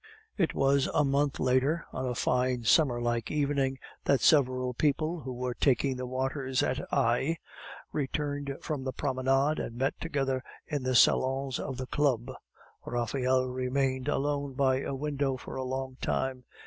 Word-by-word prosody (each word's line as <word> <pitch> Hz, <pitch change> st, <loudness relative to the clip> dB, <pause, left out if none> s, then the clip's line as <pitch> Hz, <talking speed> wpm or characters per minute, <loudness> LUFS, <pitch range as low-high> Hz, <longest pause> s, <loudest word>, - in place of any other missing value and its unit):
It 175 Hz, -6 st, 0 dB
was 135 Hz, 0 st, +3 dB
a 150 Hz, -, +4 dB
month 140 Hz, +1 st, +1 dB
later, 130 Hz, +6 st, +2 dB
on 130 Hz, 0 st, -2 dB
a 125 Hz, -, -2 dB
fine 125 Hz, -1 st, +1 dB
summer 120 Hz, +1 st, +4 dB
like 120 Hz, -1 st, -1 dB
evening, 140 Hz, -2 st, 0 dB, 0.3 s
that 140 Hz, -, +3 dB
several 130 Hz, -4 st, +3 dB
people, 155 Hz, +6 st, 0 dB
who 130 Hz, -3 st, -6 dB
were 125 Hz, 0 st, -3 dB
taking 135 Hz, +1 st, +2 dB
the 125 Hz, 0 st, -4 dB
waters 130 Hz, +1 st, -1 dB
at 130 Hz, -, 0 dB
Aix, 130 Hz, +8 st, +1 dB, 0.5 s
returned 145 Hz, -1 st, -2 dB
from 150 Hz, -4 st, -3 dB
the 130 Hz, -1 st, -3 dB
promenade 135 Hz, +2 st, +1 dB
and 115 Hz, -, -4 dB
met 135 Hz, +4 st, 0 dB
together 135 Hz, -5 st, -1 dB, 0.2 s
in 145 Hz, -2 st, -2 dB
the 130 Hz, 0 st, 0 dB
salons 130 Hz, +1 st, +3 dB
of 135 Hz, -3 st, -4 dB
the 130 Hz, -, -4 dB
Club. 125 Hz, -4 st, 0 dB, 0.5 s
Raphael 130 Hz, +2 st, 0 dB
remained 130 Hz, +1 st, -1 dB
alone 145 Hz, -1 st, -1 dB
by 130 Hz, -1 st, +2 dB
a 140 Hz, -, -3 dB
window 140 Hz, -1 st, -1 dB
for -, -, -9 dB
a 130 Hz, -, -2 dB
long 130 Hz, 0 st, -4 dB
time. 130 Hz, -1 st, -1 dB
130 Hz, 160 wpm, -29 LUFS, 130-140 Hz, 0.5 s, a